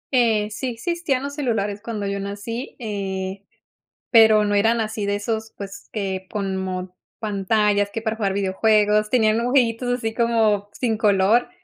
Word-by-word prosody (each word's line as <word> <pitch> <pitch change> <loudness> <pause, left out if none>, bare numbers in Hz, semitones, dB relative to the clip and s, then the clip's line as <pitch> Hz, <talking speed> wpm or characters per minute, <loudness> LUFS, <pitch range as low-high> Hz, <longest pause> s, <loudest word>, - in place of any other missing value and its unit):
Eh, 220 -4 +3
sí 255 +5 -4
existían 275 +2 -2
los 280 0 -4
celulares 220 -8 -2
cuando 220 -3 -4
yo 200 0 -2
nací, 205 +6 -5
eh, 195 -4 -4 0.7
pero 220 -2 +7
no 205 - 0
eran 225 +3 +3
así 220 -1 -3
de 200 0 0
esos, 220 +1 -3
pues 200 -1 -9
que 190 -3 -3
como 190 -2 -3 0.2
pantallas 205 -1 +1
que 225 - -4
para 220 0 -2
jugar 200 -3 0
videojuegos 210 +2 +2
tenían 220 -3 +3
dibujitos 245 0 +1
así 225 -1 -3
como 220 -4 +1
sin 230 -3 -1
color. 210 +2 +3
215 Hz, 150 wpm, -22 LUFS, 200-230 Hz, 0.7 s, pero